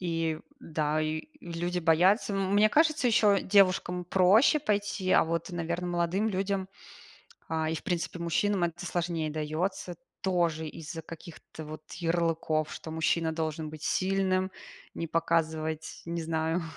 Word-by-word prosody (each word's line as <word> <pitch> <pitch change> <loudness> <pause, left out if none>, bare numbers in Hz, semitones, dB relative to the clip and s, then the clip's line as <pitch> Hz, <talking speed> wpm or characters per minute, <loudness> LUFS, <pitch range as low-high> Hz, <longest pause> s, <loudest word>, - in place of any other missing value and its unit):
И, 165 -3 -1 0.2
да, 155 -1 -1
и 155 - -2
люди 175 -2 -3
боятся. 180 +6 +3
М 195 -1 0
мне 210 +1 +6
кажется, 310 0 +3
еще 210 -3 +4
девушкам 185 -2 +3
проще 190 - +5
пойти, 205 -7 -1
а - - +6
вот, 165 +2 -2
наверное, 175 +1 -3
молодым 175 +5 0
людям, 195 -1 -1 0.8
а, 160 -1 -1
и, - - -1
в 160 - -5
принципе, 175 0 -2
мужчинам 175 +3 +1
это 170 0 -4
сложнее 170 -3 -1
дается, 160 +4 -2 0.3
тоже 170 -4 +1
из-за 165 +1 -7
каких-то 160 -1 -10
вот 155 0 -8
ярлыков, 165 -2 0
что 160 - -7
мужчина 160 0 +1
должен 160 -1 -3
быть 155 -1 -10
сильным, 190 0 +1 0.4
не 165 - -3
показывать, 160 -1 -1
не 170 0 -3
знаю, 160 +1 -1
170 Hz, 140 wpm, -29 LUFS, 160-190 Hz, 0.8 s, мне